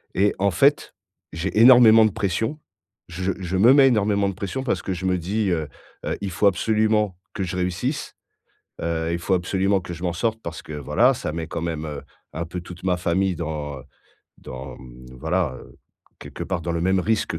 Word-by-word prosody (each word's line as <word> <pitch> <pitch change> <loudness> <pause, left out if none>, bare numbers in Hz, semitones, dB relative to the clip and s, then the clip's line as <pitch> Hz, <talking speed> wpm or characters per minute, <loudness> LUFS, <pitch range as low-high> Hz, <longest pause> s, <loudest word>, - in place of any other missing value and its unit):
et 100 +2 +3
en 100 0 +2
fait, 140 +11 +2 0.4
j'ai 95 +6 -3
énormément 115 -2 +8
de 110 - +1
pression. 110 - -2 0.5
Je 95 +3 -2
je 95 0 -2
me 115 +7 +6
mets 140 -1 +7
énormément 100 -3 +2
de - - -4
pression, 115 +9 -4
parce 130 - -1
que 95 - -4
je 90 +1 -5
me 90 -1 +2
dis, 100 +4 -1
heu 80 -3 -1 0.4
heu: - - -2
«Il 100 -2 -3
faut 100 +4 +2
absolument 105 0 +1 0.2
que 95 - -2
je 90 0 -4
réussisse», 90 - -2 0.7
heu, 80 0 -1
il - - 0
faut 95 +2 -1
absolument 95 +2 +1
que 90 0 -7
je 85 +2 -9
m'en 85 -1 0
sorte 115 +5 -1
parce 85 -1 -6
que 75 - -9
voilà, 75 -2 +2
ça - - -4
met 80 -1 -4
quand 80 - -5
même, 80 -2 -3
heu, 75 -2 -6 0.3
un 85 +1 -3
peu 90 +2 -6
toute 90 +1 -11
ma 90 -1 +1
famille 90 +1 0
dans, 75 -4 -5
heu, - - -12 0.6
dans, 65 0 -9
mmh, 65 0 -13
voilà, 80 -4 -1
heu, - - -16 0.4
quelque - - -7
part 95 -3 -3
dans 85 - -3
le 85 - -1
même 95 +1 +2
risque 105 -6 0
90 Hz, 205 wpm, -23 LUFS, 85-105 Hz, 0.7 s, énormément